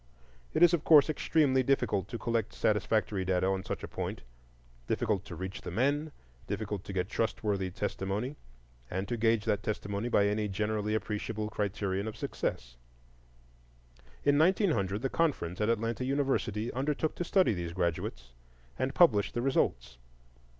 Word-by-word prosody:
It - - +5
is 175 0 +7
of 165 -3 +1
course 155 -1 +7
extremely 145 -4 +2
difficult 110 -7 +1
to 115 - -5
collect 115 -2 -1
satisfactory 105 -1 +1
data 95 0 +1
on 95 0 0
such - - -5
a - - -4
point,—difficult - - -4
to 85 - -8
reach 95 +3 -6
the - - -6
men, 140 - 0 0.4
to 105 -3 -4
get 95 -1 -1
trustworthy 105 -3 -1
testimony, 100 +7 -3 0.5
and 95 +2 -3
to 120 - -1
gauge 115 -1 +2
that 105 - +1
testimony 105 +1 -3
by 100 -4 +4
any 105 +1 0
generally 105 +1 -1
acceptable 110 0 -3
criterion 100 -1 -2
of 110 - -6
success. - - -4 1.5
In 145 0 +4
1900, 155 - +2
the - - +2
Conference 130 - -1
at 105 - +2
Atlanta 115 +2 0
University 125 -5 0
undertook 150 +4 -1
to - - -1
study 185 - +3
these 85 -3 -4
graduates, 85 -8 -2 0.5
and 130 +1 -1
published 110 - +4
the 120 - 0
results. 60 - 0
105 Hz, 145 wpm, -31 LUFS, 95-130 Hz, 1.5 s, is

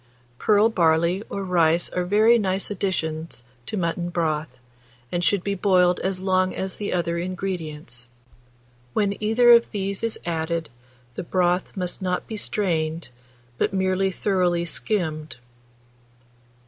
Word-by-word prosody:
Pearl 210 0 +4
barley 170 -2 +2
or 200 - -4
rice 170 -2 +2
are 180 -1 -1
very 215 +5 +5
nice 190 0 -1
additions 160 -9 -3 0.2
to 215 - -3
mutton 170 -1 -1
broth, 155 -5 -2 0.5
and 175 0 -1
should 195 0 +2
be 200 - -1
boiled 180 -2 +3
as 190 -1 -2
long 185 0 +1
as 190 0 -3
the 205 - -3
other 170 -1 -1
ingredients. 165 -8 -5 0.9
When 200 -1 +1
either 230 +3 +5
of 235 0 +6
these 200 -2 -3
is 230 -1 -2
added, 165 -2 -2 0.4
the - - -5
broth 180 +2 0
must 180 +1 -3
not 180 -1 -1
be 220 - -6
strained, 165 -7 -1 0.5
but 210 - +1
merely 190 0 +1
thoroughly 180 -3 0
skimmed. 160 -6 -2
180 Hz, 135 wpm, -24 LUFS, 170-200 Hz, 0.9 s, of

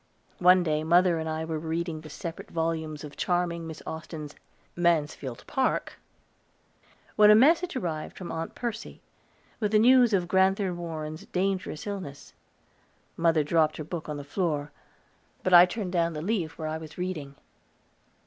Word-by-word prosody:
One 180 0 +6
day 155 -2 0
mother 175 +1 +4
and 160 0 -3
I 160 0 -3
were 160 -1 -3
reading 165 0 -3
the 155 - -11
separate 165 +2 -7
volumes 160 -2 -2
of 150 -1 -9
charming 175 -2 -1
Miss 160 -1 -9
Austen's 160 -2 -7 0.4
"Mansfield 150 -7 0
Park," 265 -1 -1 1.2
when 210 -1 +7
a 210 - +9
message 325 +9 +4
arrived 165 -9 -4
from 180 - -6
Aunt 165 0 -5
Mercy, 230 -1 -4 0.6
with 210 -3 0
the - - +6
news 245 +1 +6
of 185 -4 +1
Grand'ther 190 +1 +2
Warren's 160 -2 -6
dangerous 185 -4 -2
illness. 190 -9 -7 0.8
Mother 165 -2 +2
dropped 155 0 +2
her 155 - -4
book 160 0 -6
on 150 - -3
the 145 - -6
floor, 150 -1 -2 0.7
but 185 - +1
I 175 +1 +10
turned 190 -1 -4
down 170 -2 +1
the 150 - -5
leaf 180 -6 -2
where 155 - -4
I 155 +1 -3
was 155 -1 -11
reading. 165 -7 -4
170 Hz, 160 wpm, -27 LUFS, 155-185 Hz, 1.2 s, I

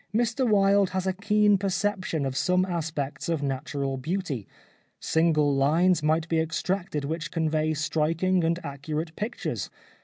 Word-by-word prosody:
Mr 240 +2 +1
Wilde 200 -1 +4
has 190 - -1
a 190 - +1
keen 205 +1 +3
perception 190 -5 -1
of 135 -1 -3
some 180 +5 +2
aspects 155 -4 -3
of 160 -4 0
natural 135 0 -2
beauty. 150 - -3 0.5
Single 155 -3 +2
lines 165 +6 +3
might 160 +2 +1
be 165 -1 +1
extracted 160 -1 -2
which 165 +3 -3
convey 155 -1 0
striking 165 +4 +1
and 165 +1 +1
accurate 155 +3 -4
pictures. 225 +4 -4
165 Hz, 140 wpm, -26 LUFS, 150-190 Hz, 0.5 s, Wilde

